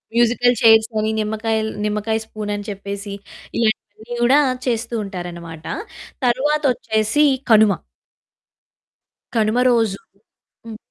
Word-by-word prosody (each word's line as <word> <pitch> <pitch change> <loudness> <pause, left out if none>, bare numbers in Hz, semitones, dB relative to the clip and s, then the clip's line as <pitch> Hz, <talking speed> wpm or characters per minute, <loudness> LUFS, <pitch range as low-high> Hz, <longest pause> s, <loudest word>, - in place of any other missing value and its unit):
Musical 240 +1 +3
చైర్సని, 220 -1 +4
నిమ్మకాయ 220 +1 -1
ల్ - - -4
నిమ్మకాయ 210 +1 -1
స్పూనని 205 -2 -5
చెప్పేసి, 200 0 -6 0.4
ఇలాంటివన్నీ 220 +1 -2
కూడా 265 +5 +5 0.3
చేస్తూ 230 -1 -2
ఉంటారన్నమాట. 170 -4 -8 0.6
తరువాతొచ్చేసి 260 -2 +1 0.3
కనుమ. 215 -2 +6 1.6
కనుమ 220 +1 +2
రోజు 225 -5 +2 0.7
హ్మ్. 225 -1 -8
220 Hz, 90 wpm, -20 LUFS, 205-235 Hz, 1.6 s, కనుమ